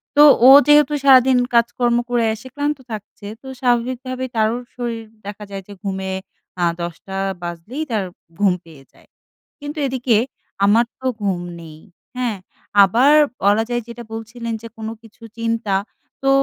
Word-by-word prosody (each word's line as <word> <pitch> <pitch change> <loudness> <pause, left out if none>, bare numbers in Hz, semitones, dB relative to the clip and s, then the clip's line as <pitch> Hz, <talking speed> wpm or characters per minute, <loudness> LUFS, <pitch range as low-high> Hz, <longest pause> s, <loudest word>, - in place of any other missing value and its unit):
তো 295 - +8 0.2
ও - - +10 0.2
যেহেতু 295 0 +5
সারাদিন 260 -2 +6 0.2
কাজকর্ম 240 0 +2
করে 240 -1 +1
এসে 220 +4 -10
ক্লান্ত 290 +1 -1
থাকছে, 210 -1 -8
তো 265 - -12
স্বাভাবিকভাবে 255 +1 -1
তারও 220 +1 +1 0.2
শরীর 235 -2 -4 0.2
দেখা 205 +1 -7
যায় 195 -1 -6
যে 205 - -10
ঘুমে, 190 -1 -3 0.5
আ - - +2 0.2
১০:০০ 175 +3 -6 0.3
বাজলেই 175 - -5
তার 215 -3 0 0.4
ঘুম 200 -3 +4
পেয়ে 155 -5 -15
যায়, - - -23 0.5
কিন্তু 290 +2 -7
এদিকে 255 -3 +1 0.5
আমার 225 +4 +4
তো 260 - -11 0.2
ঘুম 190 -3 -1 0.2
নেই। 155 -2 -11 0.4
হ্যাঁ? 240 -5 -1 0.5
আবার 240 +9 +4 0.3
বলা 205 +2 +4
যায় 240 0 -1
যেটা 235 0 -8
বলছিলেন 230 +1 -6
যে, 230 - -8
কোনো 220 0 -5
কিছু 230 0 -18
চিন্তা। 230 -3 -1 0.5
তো 270 - +3
230 Hz, 150 wpm, -20 LUFS, 205-255 Hz, 0.5 s, ও